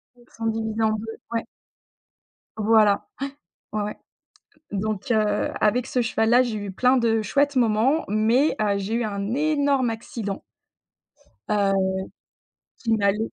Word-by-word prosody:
Ils 240 0 -23
sont 225 - -7
divisés 220 0 -2
en 220 - +3
2, 220 +1 -4
ouais. 230 -1 -1 1.1
Voilà, 215 -2 +3 0.7
ouais. 215 - -1
Ouais, - - -1
ouais 210 - -6 0.7
donc 210 +2 -2
heu, 210 -2 +1
avec 245 +4 +2
ce 250 - 0
cheval 225 -1 +1
là 245 +2 +6
j'ai 225 -3 -3
eu 200 -1 -5
plein 255 +6 +3
de 225 -2 +2
chouettes 285 +4 +1
moments 245 +6 +2
mais 225 +8 +2
heu, 200 -1 +2
j'ai 200 +3 -3
eu 240 - 0
un 200 +1 -3
énorme 285 -3 +2
accident. 220 -3 -5 1.1
Heu, 200 -2 +2 1.1
qui 225 -2 -1
m'allait 200 -1 +2
225 Hz, 145 wpm, -24 LUFS, 210-245 Hz, 1.1 s, là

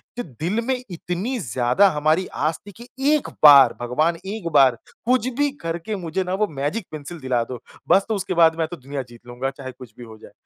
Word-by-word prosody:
कि 245 - -4
दिल 165 - -3
में 265 - +2
इतनी 180 +8 -4
ज़्यादा 125 - +2
हमारी 155 +4 +1 0.2
आस 160 - -2
थी - - -8
कि 240 - -11 0.3
एक 300 - -3
बार 140 -5 +9
भगवान, 155 +8 0
एक 200 -2 -5
बार 135 -4 +5 0.3
कुछ 250 0 +2
भी 290 0 +2
करके 165 +5 -4
मुझे 180 -1 -3
ना 180 0 -4
वो 210 +2 +1
मैजिक 150 +7 -3
पेंसिल 155 +2 -8
दिला 130 -4 0
दो, 120 0 -8 0.3
बस 195 +1 +5
तो 220 - +1
उसके 190 -2 -3
बाद 165 -1 +5
मैं 160 - +1
तो 175 +2 -8
दुनिया 135 +2 -5
जीत 120 0 -16
लूँगा 125 +2 -3
चाहे 135 -1 -9
कुछ 125 -3 -14
भी 120 - -10
हो 110 -2 -12
जाए। - - -15
160 Hz, 220 wpm, -22 LUFS, 130-190 Hz, 0.3 s, बार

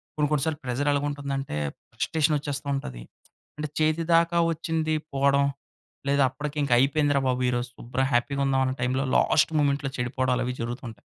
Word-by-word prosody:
కొన్ని, 150 -1 +1
కొన్ని 150 -3 +2
సార్లు 160 -1 -2
ప్రెసర్ 130 +4 0
ఎలాగుంటుందంటే, 140 - -2 0.4
ఫ్రస్ట్రేషన్ 155 -1 +1
వచ్చేస్తుంటది. 140 - -4 0.5
అంటే, 150 0 -3
చేతి 155 +1 +2
దాకా 170 +1 +3
వోచ్చింది 160 -1 -1 0.2
పోవడం. 140 0 +3 0.6
లేదా 140 -1 +4
అప్పటికి 150 +3 -6
ఇంకా 125 - +1
అయిపోయిందిరా 145 +1 +3
బాబు 125 0 0
ఈరోజు 120 0 -1
శుభ్రంగా 130 +3 -2
హ్యాపీ‌గా 140 +3 +1
ఉందాం 135 -1 +2
అనే 130 - -2
టైమ్‌లో, 130 +2 0
లాస్ట్ 155 - +3
మొమెంట్‌లో 140 -1 +1
చెడిపోవడాలు 125 0 0
అవి 125 - -2
జరుగుతుంటాయి. 115 -2 -6
140 Hz, 150 wpm, -26 LUFS, 130-150 Hz, 0.6 s, లేదా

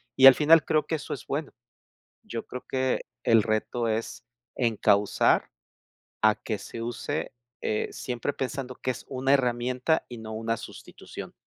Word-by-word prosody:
y 135 - +6
al 135 - +10
final 155 +1 +6
creo 155 -1 +2
que 160 - 0
eso 145 - -5
es 135 - -8
bueno. 145 +1 -3 0.7
Yo 115 - -6
creo 125 - -7
que 130 -1 0 0.2
el 115 -1 +5
reto 110 +2 -1
es 110 +1 -3 0.4
encauzar 105 -4 +3 0.7
a 110 -1 +5
que 110 - -4
se 115 - -8
use, 120 +6 -3 0.3
eh, 105 - -1
siempre 125 +2 -3
pensando 130 -1 -4
que 130 - -2
es 125 - -9
una 135 +1 +1
herramienta 125 +3 +1
y 120 - -7
no 110 0 -8
una 115 +1 -1
sustitución. - - -10
125 Hz, 155 wpm, -27 LUFS, 115-135 Hz, 0.7 s, al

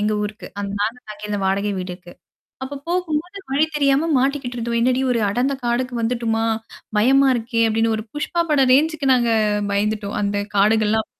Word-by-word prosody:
எங்க 210 +1 +1
ஊருக்கு 210 +1 -6
அந்த 200 -1 -4
நா 205 - +3 0.2
நாங்க 210 0 -9
அந்த 205 - -1
வாடகை 200 +2 0
வீடுக்கு. 180 -1 -7 0.5
அப்ப 280 +2 -6
போகும்போது 350 +1 -2
வழி 290 +3 +3
தெரியாம 280 +2 +2
மாட்டிக்கிட்டு 265 -2 -1
இருந்தோம். 235 0 -1
என்னடி 255 +2 +2
ஒரு 235 - +1
அடந்த 250 +6 0
காடுக்கு 245 +1 -1
வந்துட்டமா? 225 -1 0 0.5
பயமா 270 +5 +5
இருக்கே! 230 0 -1
அப்பிடின்னு 225 +1 +1
ஒரு 215 - -5
புஷ்பா 340 +3 -1
பட 290 -2 +3
ரேஞ்சு்கு 300 +2 +3
நாங்க 240 -2 +2 0.4
பயந்துட்டோம். 205 0 -1
அந்த 205 0 0 0.2
காடுகள்லாம். 215 +1 +3
235 Hz, 160 wpm, -21 LUFS, 210-275 Hz, 0.5 s, பயமா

